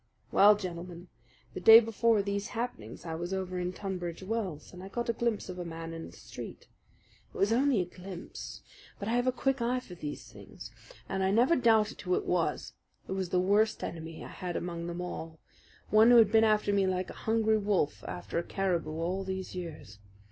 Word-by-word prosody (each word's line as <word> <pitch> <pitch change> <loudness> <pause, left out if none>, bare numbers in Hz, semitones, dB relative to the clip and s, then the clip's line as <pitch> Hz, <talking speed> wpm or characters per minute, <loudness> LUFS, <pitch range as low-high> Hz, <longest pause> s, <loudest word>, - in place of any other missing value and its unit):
"Well, 210 +1 +7
gentlemen, 180 -2 -7 0.4
the - - -5
day 225 +5 +10
before 225 -1 +2
these 200 0 -2
happenings 175 - -5
I 165 - -4
was 175 +3 -3
over 185 -1 -3
in 180 0 -2
Tunbridge 185 -3 -5
Wells, 190 -8 -4
and 180 - -9
I 190 - -8
got 235 +4 -3
a - - +3
glimpse 235 -2 -1
of 180 -1 -7
a - - -3
man 165 -1 -6
in 165 0 -7
the - - -12
street. - - -9 0.7
It - - -11
was 205 +3 +3
only 260 -3 +3
a - - -2
glimpse; 180 0 -9 0.3
but 200 - -5
I - - 0
have 245 +1 +1
a - - +5
quick 270 0 0
eye 245 +2 +1
for 225 -7 -12
these 150 -7 -7
things, 105 0 -11 0.4
and 190 - -2
I 190 - +2
never 240 +11 +4
doubted 225 -5 +3
who 180 0 0
it - - -2
was. 175 -2 -1 0.3
It - - -7
was 190 -2 -2
the 180 - +2
worst 205 +4 +2
enemy 165 -1 -6
I - - -9
had 180 -2 -5
among 170 -1 -4
them 175 +1 -4
all 165 -2 -6 0.5
one 220 +2 +7
who 245 - +8
has 225 -3 +7
been 225 +1 +5
after 215 -2 +3
me 195 -1 +3
like 185 0 -1
a - - -13
hungry 220 -1 +3
wolf 190 - 0
after 90 - -3
a - - -2
caribou 180 -4 -1
all 175 +4 -2
these 190 0 -5
years. 160 - -8
190 Hz, 210 wpm, -30 LUFS, 175-220 Hz, 0.7 s, day